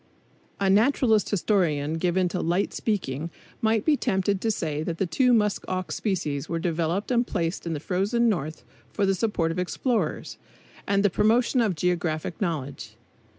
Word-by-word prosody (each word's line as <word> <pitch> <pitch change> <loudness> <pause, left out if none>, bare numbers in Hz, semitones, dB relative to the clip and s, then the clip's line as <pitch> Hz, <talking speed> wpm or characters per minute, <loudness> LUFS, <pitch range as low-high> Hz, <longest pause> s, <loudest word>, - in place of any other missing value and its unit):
A 200 - +1
naturalist 220 +1 +3
historian 165 -7 +1
given 180 +1 +1
to 180 - -2
light 175 +4 0
speaking 165 - -2 0.3
might 220 -1 +2
be 310 - +4
tempted 190 -5 0
to 225 - 0
say 155 -8 -2
that 165 +1 -3
the 195 - +1
two 250 +8 +2
musk 210 -4 +2
ox 185 -1 -3
species 160 -8 -2
were 165 - -1
developed 170 +5 -1
and 240 0 +2
placed 170 -1 -2
in 165 - -1
the 150 - -3
frozen 200 +9 +1
North 155 - -2 0.3
for 205 - 0
the 195 - +3
support 185 -5 0
of 175 - -3
explorers, 225 +6 -2 0.5
and 200 0 +2
the 200 - +4
promotion 240 +5 +3
of 210 -6 +1
geographic 170 +1 -1
knowledge. 150 -7 -3
185 Hz, 165 wpm, -26 LUFS, 165-215 Hz, 0.5 s, be